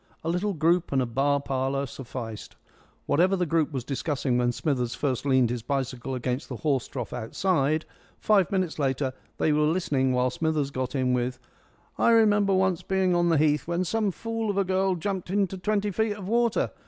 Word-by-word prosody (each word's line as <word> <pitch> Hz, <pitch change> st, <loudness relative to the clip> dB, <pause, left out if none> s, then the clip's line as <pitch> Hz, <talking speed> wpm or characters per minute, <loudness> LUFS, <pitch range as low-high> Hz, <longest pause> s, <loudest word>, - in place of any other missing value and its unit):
A 165 Hz, -, -2 dB
little 185 Hz, +4 st, 0 dB
group 165 Hz, +3 st, +2 dB
and 135 Hz, -, +2 dB
a 130 Hz, -, +1 dB
bar 135 Hz, +4 st, +1 dB
parlour 135 Hz, 0 st, -1 dB
sufficed. 120 Hz, -3 st, -7 dB, 0.5 s
Whatever 180 Hz, +6 st, +3 dB
the 180 Hz, -1 st, 0 dB
group 160 Hz, -1 st, +1 dB
was 130 Hz, -4 st, -3 dB
discussing 135 Hz, -1 st, -1 dB
when 120 Hz, 0 st, +2 dB
Smithers 125 Hz, -1 st, -1 dB
first 140 Hz, -1 st, -2 dB
leaned 130 Hz, -3 st, +3 dB
his 120 Hz, -1 st, -3 dB
bicycle 130 Hz, 0 st, -3 dB
against 125 Hz, +1 st, -3 dB
the 125 Hz, -, -4 dB
horse 135 Hz, +3 st, 0 dB
trough 125 Hz, -4 st, -6 dB
outside, 155 Hz, -, 0 dB, 0.3 s
five 200 Hz, -5 st, +3 dB
minutes 185 Hz, -5 st, -1 dB
later 135 Hz, -1 st, 0 dB, 0.2 s
they 155 Hz, -, +2 dB
were 150 Hz, -, +2 dB
listening 150 Hz, -5 st, +1 dB
while 125 Hz, 0 st, +1 dB
Smithers 155 Hz, -1 st, -1 dB
got 130 Hz, 0 st, -3 dB
in 130 Hz, -2 st, +1 dB
with 125 Hz, 0 st, -1 dB, 0.6 s
"I -, -, +4 dB
remember 205 Hz, -3 st, +4 dB
once 190 Hz, -2 st, +1 dB
being 190 Hz, -1 st, +1 dB
on 175 Hz, 0 st, +2 dB
the 165 Hz, -, +3 dB
Heath 150 Hz, 0 st, +2 dB
when 170 Hz, +1 st, 0 dB
some 215 Hz, +3 st, 0 dB
fool 225 Hz, +3 st, -3 dB
of 200 Hz, -, -1 dB
a 200 Hz, -, +3 dB
girl 190 Hz, 0 st, +1 dB
jumped 185 Hz, +1 st, -3 dB
into 195 Hz, 0 st, 0 dB
twenty 205 Hz, +2 st, -1 dB
feet 220 Hz, +2 st, 0 dB
of 200 Hz, -3 st, -8 dB
water. 235 Hz, +1 st, +1 dB
150 Hz, 190 wpm, -26 LUFS, 130-190 Hz, 0.6 s, I